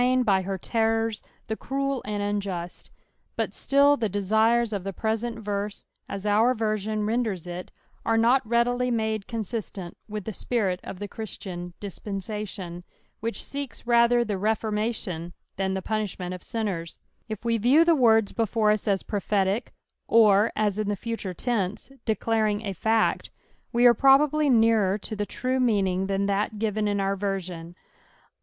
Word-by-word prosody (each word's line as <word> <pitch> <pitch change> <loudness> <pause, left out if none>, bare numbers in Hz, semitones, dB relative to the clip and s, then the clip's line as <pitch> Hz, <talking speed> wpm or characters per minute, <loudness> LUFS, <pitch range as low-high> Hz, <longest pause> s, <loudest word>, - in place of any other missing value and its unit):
restnin 255 0 +3
by 195 -2 +3
her 190 +1 -3
terrora 225 +2 0 0.2
the 220 - -3
cruel 275 +2 -2
and 205 -1 -2
anjust; 195 -4 -4 0.5
but - - -2
still 280 +1 +4
the 225 -6 -1
desires 220 +4 +2
of 200 -3 -2
the 195 - -3
present 225 +3 -2
verse, 205 -1 -4 0.2
as 200 0 -5
our 220 +5 +4
Tersion 215 -1 -1
renders 220 -6 -1
it, 175 +1 -6 0.3
are 225 - +2
not 240 +4 +4
reEtdily 245 +2 +2
mode 220 -3 -1
consistent 215 -5 -5
with 210 -1 -4
the 220 - -3
ipirit 200 -4 -1
uf - - -7
the 205 +2 -5
ChristiBD 180 -5 -7
diBpens&tion, 195 -2 -5 0.4
which 230 +1 -2
seeks 280 -3 -6
rather 235 0 +4
the 205 -3 -2
refonnation 210 -5 -1 0.2
than 190 0 0
the 190 - -3
puulah 215 -3 -2
ment 180 -1 -4
of 180 - -7
sinners. 195 -8 -4 0.3
If 215 +1 -6
we 230 -1 +1
riew 270 +9 +5
the 340 - +5
words 225 -6 +4
before 220 -1 +2
us 210 0 -1
as 195 -2 +1
prophetic, 200 +2 0 0.4
or 215 -1 +5
as 210 -1 0
in 210 -1 -1
the 205 - 0
future 215 -3 -5
tense, 215 0 -2
declaring 220 -1 0
a 200 - -2
fact, 220 +4 +1 0.4
we 240 +1 +3
are 240 - +9
probably 285 +3 +4
nearer 225 -5 +4
to 215 +1 -6
the 205 0 -2
true 255 +1 -1
meaning 195 -6 +1
than 195 0 0
that 200 +2 0
fiven 215 0 -1
!□ 205 0 0
our 195 0 +1
version. 185 -4 -4
215 Hz, 160 wpm, -26 LUFS, 195-230 Hz, 0.5 s, are